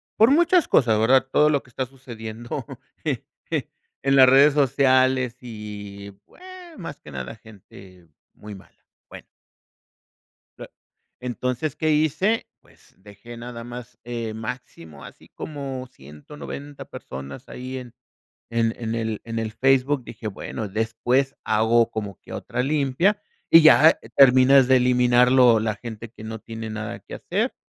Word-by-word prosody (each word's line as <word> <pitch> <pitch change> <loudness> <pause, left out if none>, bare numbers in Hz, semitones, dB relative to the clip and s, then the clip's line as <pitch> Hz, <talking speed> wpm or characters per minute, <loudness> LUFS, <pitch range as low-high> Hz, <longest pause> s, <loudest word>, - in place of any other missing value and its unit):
Por 225 +5 +5
muchas 345 +2 +3
cosas, 115 -5 +3
¿verdad? 130 +4 +3
Todo 150 +2 +4
lo 145 -2 +1
que 125 - -22
está 130 +2 -3
sucediendo 120 -3 -8 1.4
en 135 0 +3
las 130 -1 +8
redes 140 +2 +6
sociales 130 -3 +2
y, 105 -3 -9
bueno, 370 - -18 0.3
más 165 -5 -7
que 75 - -12
nada 65 - -6
gente 95 -4 -16 0.3
muy 105 -1 -10
mala. 95 - -19 0.2
Bueno. - - -12 1.3
Ah - - -9 0.5
entonces, 125 +3 -3
¿qué 155 0 0
hice? 155 +9 +1
Pues, - - -25
dejé 105 +4 -13
nada 120 -1 -8
más, 120 -1 -10
eh, 115 -2 -5
máximo 95 - -8
así - - -14
como 135 -4 -6
190 135 - -10
personas 70 +1 -9
ahí 130 +1 -7
en 120 -2 -11 0.6
en 115 -1 0
en 115 -1 -4
el 110 -2 -3
en 115 0 -4
el 110 -1 -3
Facebook. 135 +2 +2
Dije: 110 -1 -9
"Bueno, 105 +2 -6
después 115 +6 0
hago 115 +2 +2
como 105 -4 -6
que - - -13
otra 125 +1 -3
limpia", 150 +8 +1 0.3
y 165 - +9
ya 155 +1 +7 0.2
terminas 130 0 +6
de 130 - +6
eliminar 125 0 +4
lo 120 -4 +6
la 110 -1 -2
gente 115 -1 -9
que 110 - -13
no 110 0 -6
tiene 115 -1 -7
nada 110 0 -5
que - - -11
hacer - - -2
120 Hz, 145 wpm, -23 LUFS, 110-135 Hz, 1.4 s, y